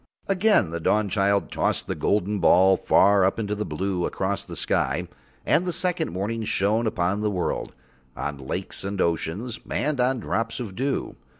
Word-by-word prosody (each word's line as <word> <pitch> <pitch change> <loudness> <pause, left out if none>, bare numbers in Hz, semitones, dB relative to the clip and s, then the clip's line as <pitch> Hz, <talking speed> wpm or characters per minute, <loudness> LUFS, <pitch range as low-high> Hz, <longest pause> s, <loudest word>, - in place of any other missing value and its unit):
Again 195 - +3
the 85 - -3
Dawnchild 100 +1 +1
tossed - - 0
the - - -2
golden 105 0 0
ball 95 +2 +5
far 100 +1 +4
up 95 - +2
into 105 -2 -2
the 105 0 -3
blue 90 +3 -1
across - - -2
the - - -9
sky, 80 +7 0 0.4
and 175 - +3
the 180 - -1
second 180 - -1
morning 105 +6 -3
shone 110 +3 +1
upon 100 0 0
the 105 - +1
world, 90 -4 -2 0.4
on 70 +2 -4
lakes 65 +7 -5
and 100 0 -4
oceans, 95 +8 -1
and 140 0 0
on 125 +1 +1
drops 115 +2 -2
of 105 -6 -6
dew. 135 +4 -2
100 Hz, 170 wpm, -25 LUFS, 90-115 Hz, 0.4 s, ball